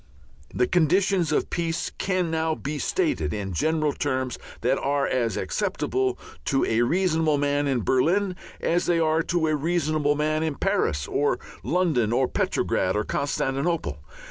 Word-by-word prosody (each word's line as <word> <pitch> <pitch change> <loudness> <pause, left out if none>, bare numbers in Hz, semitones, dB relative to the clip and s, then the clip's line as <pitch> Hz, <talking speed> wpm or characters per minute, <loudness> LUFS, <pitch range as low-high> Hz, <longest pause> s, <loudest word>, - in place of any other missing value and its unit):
The 125 - +2
conditions 180 +3 +2
of - - 0
peace 165 -1 -2
can 185 -3 0
now 160 0 0
be 145 0 -4
stated, 325 - 0
in 100 -2 -4
general 155 - +1
terms 130 -3 -2 0.2
that 130 +3 +1
are 140 0 0
as 115 -5 0
acceptable 130 -1 -1 0.3
to 135 - +2
a 115 +1 +1
reasonable 160 +1 +2
man 145 0 +1
in 130 -5 0
Berlin 180 - +2 0.2
as 175 +1 0
they 175 - +3
are 160 0 +2
to 170 0 0
a 155 -1 +2
reasonable 155 -1 +1
man 155 +1 0
in 160 -2 -1
Paris 70 - 0
or 145 +1 +1 0.2
London 155 -11 +1
or 130 +2 +2
Petrograd 95 -5 0
or 105 - +1
Constantinople. 140 - -1
150 Hz, 150 wpm, -25 LUFS, 130-165 Hz, 0.3 s, they